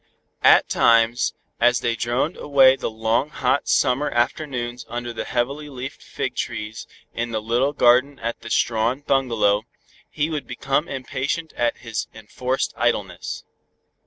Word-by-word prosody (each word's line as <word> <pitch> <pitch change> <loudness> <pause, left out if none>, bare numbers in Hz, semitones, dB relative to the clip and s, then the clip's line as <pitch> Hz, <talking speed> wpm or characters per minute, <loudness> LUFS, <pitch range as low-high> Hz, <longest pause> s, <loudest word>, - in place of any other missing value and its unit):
At - - +6
times, 115 +1 +3 0.2
as 120 0 +4
they 115 -1 0
droned 120 +8 -1
away 135 -2 +5
the - - -3
long 110 +5 0
hot 140 -1 0
summer 135 +4 +2
afternoons 120 -1 -2
under 120 0 -4
the - - -4
heavily 140 +5 -2
leafed 130 -1 -7
fig - - -4
trees 105 +1 -4 0.3
in 120 0 -2
the 110 -1 -2
little 120 +6 +1
garden 130 +1 +4
of 115 - -2
the 115 - -9
Strawn 115 +4 +1
bungalow, 115 -7 +2 0.5
he 150 0 -1
would 150 -2 -4
become 140 +4 -1
impatient 135 +4 -3
at 120 0 0
his 115 -2 -4
enforced 125 +4 -2
idleness. 100 -7 -2
120 Hz, 140 wpm, -22 LUFS, 115-135 Hz, 0.5 s, At